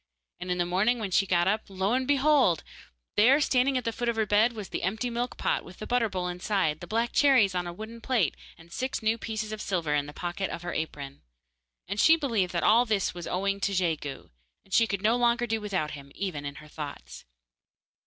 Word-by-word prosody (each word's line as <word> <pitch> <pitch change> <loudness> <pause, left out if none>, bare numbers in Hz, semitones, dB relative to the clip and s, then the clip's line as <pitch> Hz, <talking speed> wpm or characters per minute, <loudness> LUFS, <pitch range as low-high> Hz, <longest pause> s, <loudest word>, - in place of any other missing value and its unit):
and 180 - -6
in 180 - 0
the 175 - +1
morning 195 +8 +2
when 210 -4 -4
she 195 +2 +3
got 175 -1 +2
up, 210 +3 +2
lo 195 +3 -1
and 260 0 0
behold! 275 - +3 0.5
there 235 +6 +6
were - - +2
standing 265 -2 +2
at 250 - -2
the 230 - -1
foot 240 +1 -2
of 235 - 0
her 220 -1 +1
bed 210 +4 +3
the 210 -3 -5
empty 220 +7 -2
milk 240 +1 -3
pot - - 0
with 180 +1 -13
the 215 - -7
butter 240 -2 +1
bowl 185 -2 -3
inside, 180 -3 -1
the 175 - -9
black 230 +4 0
cherries 255 -9 +4
on 180 -1 -1
the 175 - -4
wooden 220 +5 -9
plate, 225 - +1 0.2
and 165 +1 -17
six 255 +3 -3
new 220 +1 +3
pieces 215 -1 -4
of 215 -1 -5
silver 170 -6 -1
in 145 -1 0
the - - -7
pocket 175 +4 -4
of 170 - -6
her 175 - -4
apron. 140 -3 -5 0.7
And 200 +2 -3
she 320 - +7
believed 230 - 0
that 170 - -1
all 230 +3 +6
this 215 -4 0
was 175 -1 -7
owing 195 +2 -1
to 200 0 -1
Jegu, 160 -6 -2 0.3
and 195 - -13
she 230 - +5
could 200 -2 -3
no 225 +3 +3
longer 240 0 +2
do 225 -1 -2
without 190 -7 -2
him, 140 -1 -10
even 175 -7 -4
in 140 0 -5
her 150 +1 -12
thoughts. 150 -1 -8
200 Hz, 235 wpm, -28 LUFS, 175-230 Hz, 0.7 s, she